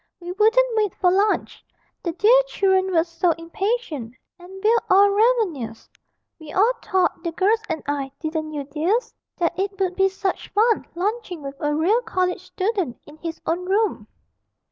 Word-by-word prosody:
We 350 0 -6
wouldn't 450 +5 +3
wait 425 -4 +1
for 360 -1 +2
lunch, 405 +3 0 0.4
the 340 - -2
dear 450 +8 +5
children 380 -4 +1
were 330 -2 +3
so 335 0 0
impatient, 330 - -3 0.2
and 380 +2 -12
we're 445 +2 +5
all 400 +1 +6
ravenous! 400 - 0 0.5
We 310 -2 -10
all 430 +9 +3
thought, 375 -2 +1
the 335 - -2
girls 405 +7 +2
and 320 -2 -3
I 280 -2 -2
(didn't 315 -1 -3
you, 295 -2 -4
dears?) 320 - -1 0.2
that 345 0 -1
it 390 0 -2
would 370 -2 0
be 385 0 +3
such 385 0 -3
fun 445 +2 +2
lunching 380 -3 -3
with 275 0 -5
a 295 0 0
real 380 +10 +2
college 365 -5 -1
student 380 - -2
in 295 +1 -14
his 325 0 -6
own 345 +2 -1
room.' 410 +3 0
370 Hz, 165 wpm, -22 LUFS, 325-420 Hz, 0.5 s, all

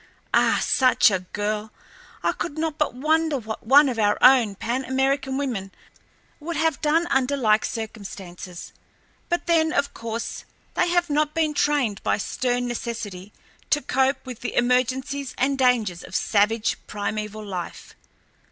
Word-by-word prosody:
Ah, - - +4
such 255 -4 +4
a 190 - +1
girl! 210 +3 -4 0.5
I - - +3
could 315 -3 -5
not 315 -1 -2
but 300 - 0
wonder 310 +2 +1
what 220 -2 -7
one 285 +3 +7
of 245 -4 -2
our 205 -1 +3
own 250 -6 +6
Pan 240 +6 -2
American 265 +1 0
women 230 -9 -3 0.7
would 330 +2 -5
have 320 -2 +1
done 320 +3 +2
under 270 +1 +2
like 215 -4 +3
circumstances. 195 -5 -7 0.6
But 345 -1 -1
then, 320 -2 +3
of 280 -1 0
course, 230 0 -5 0.3
they 355 - +1
have 345 -2 +1
not 300 +1 +1
been 315 -2 +1
trained 280 -9 +1
by - - +1
stern 245 +3 -1
necessity 215 -5 -5 0.4
to 295 - +3
cope 265 +1 0
with 255 -3 -7
the - - -5
emergencies 255 +3 0
and 275 +2 +1
dangers 235 -9 +1
of - - -9
savage 215 +1 +1
primeval 210 +1 -4
life. 185 -4 -6
255 Hz, 150 wpm, -24 LUFS, 215-285 Hz, 0.7 s, one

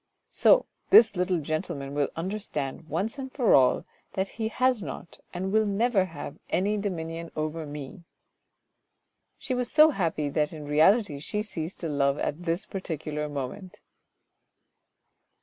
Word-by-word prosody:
"So - - +5 0.2
this 220 -3 +7
little 180 0 +1
gentleman 155 -2 -3
will 145 -1 +1
understand, 165 -5 -4
once 200 - -2
and 265 -1 -6
for 250 -5 +3
all, 130 -2 +4 0.3
that 190 0 -1
he 220 -1 -3
has 255 0 +1
not, 175 - -8
and 190 +2 -3
will 220 0 +3
never 205 -1 +2
have, 160 -5 -8
any 200 +4 +1
dominion 165 -4 -4
over 155 0 -3
me." 145 +3 -8 1.4
She 260 - -4
was 250 -1 -1
so 310 +1 +7
happy 165 - -1
that 150 +2 0
in 150 -2 -8
reality 155 +2 +3
she 210 +8 -3
ceased 170 -4 -6
to 170 - -2
love 140 -2 +1
at 170 +5 -3
this 170 +2 -1
particular 155 -5 -4
moment. 145 +7 -6
170 Hz, 145 wpm, -27 LUFS, 150-205 Hz, 1.4 s, this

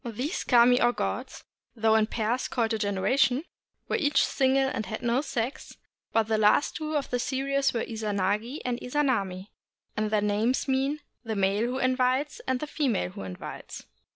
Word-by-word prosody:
These 250 - -3
kami 245 0 +5
or 240 0 +4
gods, - - -4 0.3
though 220 -1 +3
in 220 -1 +4
pairs 230 +3 -1
called 230 -2 0
a 220 - -1
genera 200 +2 0
tion, 275 +1 +3 0.4
were - - 0
each 290 -2 +3
single 270 0 +2
and 220 -6 -3
had 220 +4 -5
no 240 +2 +2
sex; 250 -3 -4 0.3
but 225 - +3
the 220 0 0
last 210 +7 +3
two 310 -1 -3
of 285 - -4
the 245 - 0
series 275 +2 0
were 230 - -2
Izanagi 215 +3 -2
and 245 -1 -1
Izanami, 220 -9 -1 0.5
and 215 0 0
their 210 -1 +2
names 210 +6 +1
mean 270 +3 0 0.2
The 225 -2 -3
Male 200 +3 +1
Who 250 +1 -2
Invites, 255 +2 +1
and 260 -1 +1
The 300 - -3
Female 260 - -1
Who - - -8
Invites. 95 -1 -8
240 Hz, 180 wpm, -27 LUFS, 215-270 Hz, 0.5 s, kami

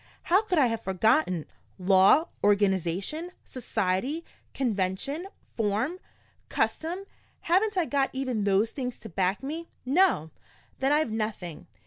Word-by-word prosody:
How 370 +4 +4
could 385 -5 -1
I 285 - +6
have 230 -2 -1
forgotten? 190 - +2 0.3
Law, 190 - +5 0.2
organization, 200 - +1 0.2
society, 240 - -2 0.3
convention, 235 - -1 0.3
form, 225 - 0 0.5
custom 350 +5 -1 0.4
haven't 385 +4 +2
I 355 - +3
got 280 -2 +1
even 255 -5 -2
those 200 +2 +2
things 250 -3 -4
to 220 - -10
back 190 +5 0
me? 320 +5 -4 0.2
No? 270 - +3 0.5
Then 270 +1 +2
I've 295 -5 +2
nothing! 215 -7 -4
235 Hz, 120 wpm, -27 LUFS, 195-315 Hz, 0.5 s, I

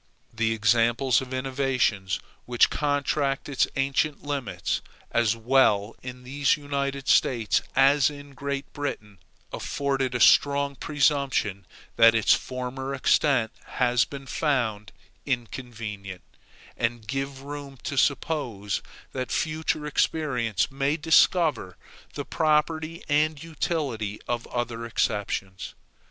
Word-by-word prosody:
The 110 0 0
examples 115 +3 +3
of 130 -1 -8
innovations 130 -7 0 0.3
which 120 -1 +3
contract 145 -1 0
its 140 -2 +1
ancient 140 +2 0
limits, 140 -7 -2 0.3
as 115 -1 +2
well 115 -3 +2
in 125 0 -8
these 140 +3 +1 0.5
States 115 -5 +3
as 135 +1 +5
in 145 -1 -11
Great 140 0 -4
Britain, 105 - -5 0.3
afford 140 -1 -2
a 125 -2 -1
strong 140 +2 +4
presumption 135 - 0 0.3
that 115 0 +7
its 115 - +5
former 130 +1 -3
extent 130 -3 +2 0.3
has 125 -1 +3
been 140 -1 -8
found 120 - -1 0.4
inconvenient, 115 -7 -5 0.5
and 115 -1 -2
give 135 +1 -4
room 140 -1 -7
to 140 - -3
suppose 130 -8 0 0.3
that 130 -1 -4
future 155 -1 -1
experience 125 - 0
may 140 +3 0
discover 160 - +3 0.4
the - - -4
propriety 155 +1 0
and 150 0 +1
utility 140 -10 -2
of 120 -1 -2
other 120 -1 -3
exceptions. 100 -4 -2
130 Hz, 110 wpm, -26 LUFS, 115-145 Hz, 0.5 s, that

